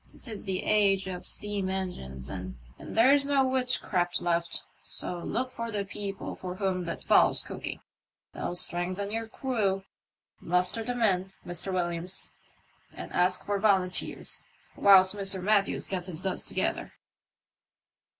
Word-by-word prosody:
This - - -5
is 220 -2 -6
the 190 -2 -2
age 200 -2 +3
of 185 -2 -6
steam 205 -2 0
engines, 175 - -4
and 95 +1 -6 0.2
there's 270 +5 +3
no 280 -1 +2
witchcraft 250 -9 0
left, 170 -1 -1 0.2
so 175 - -4
look 255 +8 -3
for 230 -2 -5
the 205 -2 -3
people 200 0 -6
for 180 -1 -7
whom 185 -2 -1
that 170 - -5
fowl's - - +5
cooking; - - -7 0.5
they'll 175 - -4
strengthen 185 +3 +3
your 225 +1 -3
crew. 215 -6 -1 0.6
Muster 180 +5 +4
the 245 +2 -3
men, 190 -5 0
Mr. 175 +2 0
Williams, 175 0 -1 0.6
and - - -9
ask 180 +1 +2
for 205 -1 -1
volunteers, 190 -3 +1 0.3
whilst 190 -1 +6
Mr. 195 -1 -1
Matthews 200 +1 +1
gets 185 -2 -3
his 175 -1 0
duds 190 -1 0
together." - - -2
190 Hz, 140 wpm, -28 LUFS, 180-210 Hz, 0.6 s, whilst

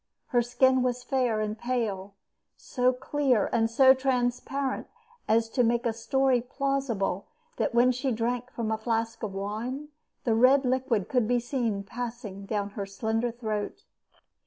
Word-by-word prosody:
Her 245 -2 +3
skin 255 +2 +3
was 250 0 -1
fair 250 -5 0
and 215 0 -2
pale, 215 -5 -3 0.4
so 250 -1 +1
clear 260 -2 +1
and 225 -1 +2
so 260 +3 +7
transparent 260 +1 -1 0.4
as 225 +1 +3
to 250 +1 +2
make 235 +1 +2
the 235 -2 0
story 260 +2 +2
plausible 250 -7 -1 0.3
that 250 - -1
when 245 +2 +5
she 255 +2 -1
drank 240 +2 -1
from 230 -3 -3
a 220 - -1
flask 225 0 -2
of 205 -3 -4
wine, 230 +9 -4 0.3
the 230 - +2
red 255 +4 +5
liquid 255 -5 0
could 245 -4 +1
be 245 +1 +2
seen 235 -5 -2
passing 225 -3 -6
down 205 -1 -2
her 200 -1 -4
slender 220 +4 -1
throat. 220 -3 -4
240 Hz, 155 wpm, -28 LUFS, 220-255 Hz, 0.4 s, so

